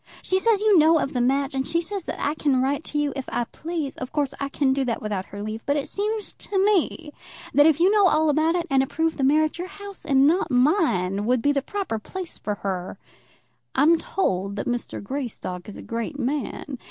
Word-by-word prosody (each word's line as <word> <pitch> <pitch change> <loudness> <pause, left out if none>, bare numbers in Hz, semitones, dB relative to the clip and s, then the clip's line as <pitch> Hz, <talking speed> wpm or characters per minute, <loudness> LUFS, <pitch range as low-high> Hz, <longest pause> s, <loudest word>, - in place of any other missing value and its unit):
She 375 - +1
says 435 0 +2
you 420 -4 +5
know 320 +2 +6
of 275 - -1
the 250 - 0
match, 275 +3 +1
and 265 0 -1
she 335 - +1
says 375 +2 -4
that - - -5
I 290 - 0
can 285 -4 +1
write 275 +4 0
to 295 - -4
you 295 -2 0
if 270 -2 -5
I 240 - 0
please. 310 +2 -5
Of 255 - -6
course, 285 -3 -1
I 280 - -2
can 275 -1 +1
do 275 0 0
that 240 -3 -1
without 205 -3 -3
her 205 +1 -7
leave. 215 +1 -5
But 285 +1 +2
it 280 - -2
seems 425 +1 -2
to 400 - -5
me 375 -6 +1 0.4
that 290 +1 +6
if 315 -1 +3
you 365 +3 +5
know 415 -2 +5
all 315 -2 +3
about 315 +3 +2
it, 345 -1 0
and 270 -1 +4
approve 320 +4 -1
the 275 - -1
marriage, 310 +4 +2
your 355 - -3
house 400 0 -10
and 275 -4 +4
not 345 +5 +2
mine 245 - +2
would 250 -1 +2
be 285 - +4
the 280 -1 +1
proper 375 - -3
place 365 - -7
for 210 - -3
her. 190 0 -3 0.8
I'm 320 +5 +5
told 200 - -1
that 205 - -3
Mr. 245 -4 -3
Greystock 215 -6 -5
is 205 - -9
a - - -9
great 230 +5 -4
man. 275 0 -3
285 Hz, 230 wpm, -24 LUFS, 250-335 Hz, 0.8 s, know